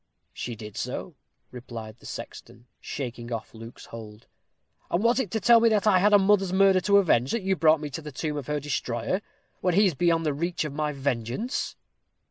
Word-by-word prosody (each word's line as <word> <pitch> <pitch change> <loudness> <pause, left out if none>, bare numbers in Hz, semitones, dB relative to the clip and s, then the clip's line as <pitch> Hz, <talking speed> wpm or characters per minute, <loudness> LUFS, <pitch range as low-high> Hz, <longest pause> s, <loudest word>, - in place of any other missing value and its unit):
"She 120 - -5
did 105 -1 -10
so," - - -4 0.4
replied 115 -3 -8
the - - -12
sexton, 120 0 -9
shaking 120 -3 -6
off 115 -1 -5
Luke's 115 +1 -11
hold. 110 -1 -10 0.6
"And 175 +5 0
was 235 +3 +3
it 230 - -1
to 220 - -1
tell 235 +1 +6
me 230 0 +4
that 215 -2 +1
I 200 -4 +5
had 205 +3 +4
a 205 - +8
mother's 195 -1 +3
murder 190 0 +4
to 200 +1 +4
avenge, 135 -10 +3
that 230 -4 -1
you 190 0 +1
brought 160 -2 +4
me 150 -1 -5
to 150 - -5
the 150 -1 -8
tomb 150 +2 -3
of 145 -3 -5
her 150 0 -1
destroyer 130 - -2 0.4
when 180 -2 +1
he 205 +2 +5
is 185 - +2
beyond 165 +2 +1
the 150 - +1
reach 170 +2 -2
of 150 - -5
my 150 0 -1
vengeance?" 135 - -2
150 Hz, 210 wpm, -26 LUFS, 120-195 Hz, 0.6 s, a